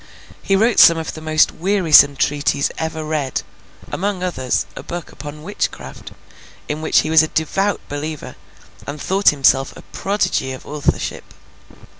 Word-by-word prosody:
He 195 Hz, -, +1 dB
wrote 225 Hz, +3 st, +3 dB
some 170 Hz, -, +8 dB
of 160 Hz, 0 st, -4 dB
the 155 Hz, -, -9 dB
most 155 Hz, -1 st, +3 dB
wearisome 165 Hz, -6 st, +4 dB
treatises 145 Hz, 0 st, 0 dB
ever 160 Hz, 0 st, -3 dB
read—among 160 Hz, +6 st, -4 dB
others, 130 Hz, -8 st, -1 dB
a -, -, -7 dB
book 175 Hz, -1 st, -7 dB
upon 150 Hz, 0 st, -9 dB
witchcraft, 70 Hz, -, -5 dB, 0.5 s
in 150 Hz, +1 st, -4 dB
which 160 Hz, -, +3 dB
he 155 Hz, -, -4 dB
was 160 Hz, -1 st, +7 dB
a 160 Hz, -, 0 dB
devout 195 Hz, +6 st, -1 dB
believer—and 150 Hz, 0 st, -8 dB
thought 195 Hz, +6 st, +3 dB
himself 135 Hz, -1 st, +2 dB
a -, -, -12 dB
prodigy 185 Hz, -9 st, -2 dB
of 130 Hz, -, -10 dB
authorship. 150 Hz, -1 st, -2 dB
155 Hz, 140 wpm, -19 LUFS, 145-185 Hz, 0.5 s, some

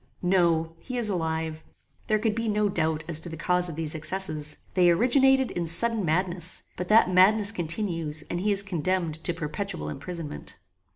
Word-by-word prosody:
"No. 170 Hz, -3 st, +1 dB
He 255 Hz, -1 st, -6 dB
is 230 Hz, -3 st, +1 dB
alive. 160 Hz, -3 st, -3 dB, 0.4 s
There 215 Hz, -, +2 dB
could 215 Hz, 0 st, 0 dB
be 230 Hz, 0 st, -2 dB
no 210 Hz, 0 st, +1 dB
doubt 160 Hz, -4 st, -1 dB
as 165 Hz, -2 st, +5 dB
to 170 Hz, -, -6 dB
the 160 Hz, -, -7 dB
cause 180 Hz, +2 st, 0 dB
of 160 Hz, -, -7 dB
these 160 Hz, -1 st, -3 dB
excesses. 155 Hz, -2 st, -3 dB, 0.2 s
They 180 Hz, -2 st, +4 dB
originated 265 Hz, +7 st, +3 dB
in 170 Hz, -1 st, -3 dB
sudden 220 Hz, +6 st, +2 dB
madness; 175 Hz, +1 st, +1 dB
but 180 Hz, -, -5 dB
that 215 Hz, -3 st, +4 dB
madness 200 Hz, +3 st, +5 dB
continues. 165 Hz, -5 st, -2 dB
and 175 Hz, -, -3 dB
he 205 Hz, +3 st, 0 dB
is 200 Hz, 0 st, +2 dB
condemned 175 Hz, -3 st, -2 dB
to -, -, 0 dB
perpetual 180 Hz, +3 st, -4 dB
imprisonment." 165 Hz, -, -7 dB
180 Hz, 175 wpm, -26 LUFS, 160-205 Hz, 0.4 s, as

